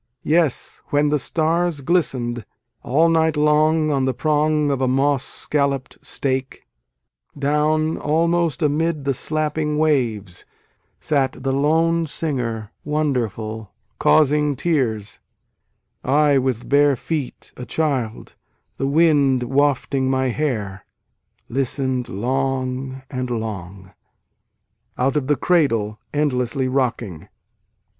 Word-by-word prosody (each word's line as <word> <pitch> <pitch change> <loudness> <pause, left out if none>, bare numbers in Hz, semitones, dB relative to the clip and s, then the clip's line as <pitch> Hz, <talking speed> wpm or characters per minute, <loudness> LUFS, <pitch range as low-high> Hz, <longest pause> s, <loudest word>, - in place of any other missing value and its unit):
Yes, 155 -3 0
when 145 +1 +2
the 150 0 +1
stars 165 +1 0
glisten 135 -7 +1
d, 120 -1 -7 0.4
All 155 +7 +3
night 160 -2 +2
long 155 +1 +3
on 135 -2 +1
the 130 -2 -1
prong 150 +1 +1
of 135 -1 -1
a 130 - +2
moss 135 +1 +2
scallop 140 -3 -1
d - - -19
stake, 135 -1 -3 0.7
Down, 150 +2 +1
almost 165 0 +1
amid 150 0 0
the 140 - +1
slapping 155 +2 -1
waves, 115 - 0 0.6
Sat 140 -4 0
the 135 - 0
lone 160 +4 +2
singer 120 -9 -3
wonderful 115 -8 -2 0.2
causing 150 -1 +3
tears 125 -9 -1 0.8
I, 145 +1 +3
with 125 -3 -2
bare 145 0 +4
feet, 145 +1 -5
a 125 - -8
child, 135 -8 -2 0.4
the 135 - -1
wind 140 -4 +3
wafting 135 0 +1
my 130 -1 +1
hair, 110 -8 -2 0.6
Listen 130 0 -1
d 125 - -11
long 130 +3 -2
and 130 -2 -3
long....... 100 -5 -5 1.1
(Out 130 +3 +1
of 145 -3 0
the 145 - +3
Cradle 115 -10 +1
Endlessly 130 -3 0
Rocking.) 120 - -2
140 Hz, 115 wpm, -21 LUFS, 125-150 Hz, 1.1 s, bare